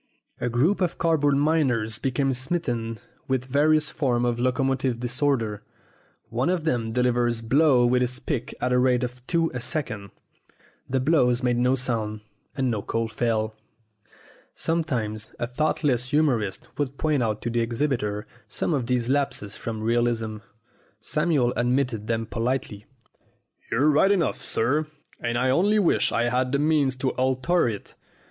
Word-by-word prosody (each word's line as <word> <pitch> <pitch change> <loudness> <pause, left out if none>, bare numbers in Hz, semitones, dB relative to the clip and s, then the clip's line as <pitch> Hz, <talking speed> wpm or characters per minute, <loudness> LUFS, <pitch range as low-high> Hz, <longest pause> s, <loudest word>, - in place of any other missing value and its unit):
A 120 - -1
group 150 - +2
of 175 -2 0
card 165 -2 +2
board 145 -1 +3
miners 130 -8 +1
became 135 +1 0
smitten 125 -5 -2 0.3
with 130 -1 0
various 150 +3 +2
forms 125 -5 0
of 120 -1 0
locomotive 130 -1 0
disorder. 120 -4 0 0.7
One 125 +7 0
of 180 -3 0
them 120 -7 0
delivered 120 -1 +1
blows 135 -2 +4
with 125 0 +3
his 125 0 0
pick 130 -5 -3
at 125 - 0
the 125 0 +3
rate 125 0 +3
of 125 +1 -5
two 165 -1 +1
a 125 - -3
second. 110 -7 -4 0.8
The 130 +1 +1
blows 130 -3 +2
made 120 -1 +2
no 125 +2 +3
sound, 110 -4 -2 0.4
and 130 -2 +1
no 110 -3 -1
coal 115 +2 -2
fell. 110 -1 -1 1.0
Sometimes 120 -10 -2
a - - -1
thoughtless 130 -1 0
humorist 125 -11 +1
would 140 -1 -2
point 150 -4 +1
out 110 -2 -1
to 120 - -2
the 120 - 0
exhibitor 115 -3 -1 0.2
some 160 - -1
of 130 -5 -1
these 125 -2 0
lapses 135 -7 -1
from 110 -2 -5
realism. 115 -1 0 0.6
Samuel 150 -1 +1
admitted 120 -3 0
them 115 -1 -1
politely. 115 -2 -3 0.8
"You're 145 +6 +3
right 155 +7 +4
enough, 175 -8 +1
sir, 145 +7 0 0.3
and 120 0 -1
I 130 +1 +2
only 200 +9 +3
wish 195 -5 +2
I 115 - +1
had 125 +1 0
the - - +4
means 145 -3 +2
to 130 0 -1
alter 130 +4 +1
it. 105 -3 -7
125 Hz, 155 wpm, -25 LUFS, 115-145 Hz, 1.0 s, blows